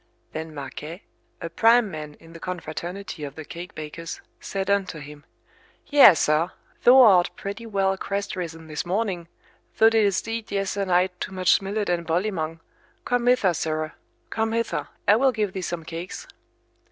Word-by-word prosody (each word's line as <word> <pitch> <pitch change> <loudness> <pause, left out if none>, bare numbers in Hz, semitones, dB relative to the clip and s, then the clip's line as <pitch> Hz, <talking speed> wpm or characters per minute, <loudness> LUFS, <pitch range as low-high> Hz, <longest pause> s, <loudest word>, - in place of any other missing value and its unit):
Then 160 0 -6
Marquet, 150 +5 -7 0.4
a - - -3
prime 230 +2 +4
man 150 -2 -7
in 165 0 -16
the 165 - -10
confraternity 180 0 -6
of 140 -1 -6
the 155 - -8
cake 175 +4 -9
bakers, 155 +2 -7 0.2
said 195 -1 -4
unto 200 -4 0
him, 150 0 -11 0.6
Yea, 280 - +8
sir, 155 +3 +2 0.3
thou 260 +2 +8
art 190 -7 +6
pretty 205 +4 -6
well 195 -2 +1
crest 200 +1 -3
risen 165 -3 -6
this 155 -1 -4
morning, 180 -2 -2 0.5
thou 225 - +7
didst 210 -3 +2
eat 225 -1 -4
yesternight 195 -2 +1
too 190 - -5
much 185 +1 +3
millet 205 +2 -2
and 170 -2 -1
bolymong. 165 -2 -1 0.4
Come 245 0 0
hither, 225 -8 +4
sirrah, 155 -1 -2 0.4
come 225 0 0
hither, 230 0 -1 0.2
I 205 - +7
will 265 +2 +4
give 210 -5 -1
thee 190 - -4
some 175 -2 -4
cakes. 165 +3 -6
185 Hz, 160 wpm, -25 LUFS, 165-205 Hz, 0.6 s, Yea